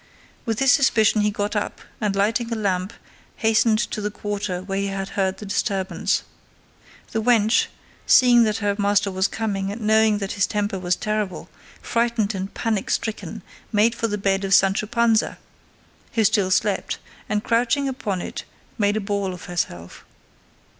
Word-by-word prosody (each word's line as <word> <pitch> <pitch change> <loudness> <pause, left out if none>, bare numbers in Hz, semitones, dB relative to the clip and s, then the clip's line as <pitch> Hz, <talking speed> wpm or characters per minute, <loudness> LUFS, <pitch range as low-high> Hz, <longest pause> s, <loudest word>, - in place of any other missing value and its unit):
With 225 -2 0
this 270 +2 +4
suspicion 225 -6 +4
he 210 - +2
got 205 +1 -3
up, 210 - -2 0.2
and 205 -2 0
lighting 225 +4 0
a - - 0
lamp 190 -2 -1 0.4
hastened 220 0 +3
to 215 0 -2
the 210 - -1
quarter 205 -3 -4
where 195 0 -3
he 200 - -1
had 195 0 -4
heard 190 -1 -1
the 210 - -8
disturbance. 195 -1 -1 0.9
The 220 - -1
wench, 225 -1 +3 0.4
seeing 245 -2 +6
that 215 -1 0
her 200 -1 +1
master 200 0 +2
was 190 +1 +1
coming 200 -3 -2
and 220 +3 -7
knowing 220 0 +3
that 195 -1 -4
his 200 - +1
temper 205 -2 -2
was 180 -1 0
terrible, 215 -3 -3 0.3
frightened 230 -3 0
and 190 0 -4
panic 220 -3 -2
stricken 220 -1 -3 0.3
made 220 +1 +3
for 230 -1 -1
the 210 -1 -2
bed 195 -1 0
of 195 0 +4
Sancho 195 +2 +3
Panza, 235 -1 +2 0.8
who 225 - +2
still 205 -2 +2
slept, 195 +1 0 0.3
and 210 0 0
crouching 245 +4 +1
upon 210 -9 -3
it - - -6 0.4
made 205 0 +2
a - - -1
ball 200 -2 -2
of - - -11
herself. 90 - -4
210 Hz, 165 wpm, -23 LUFS, 195-225 Hz, 0.9 s, seeing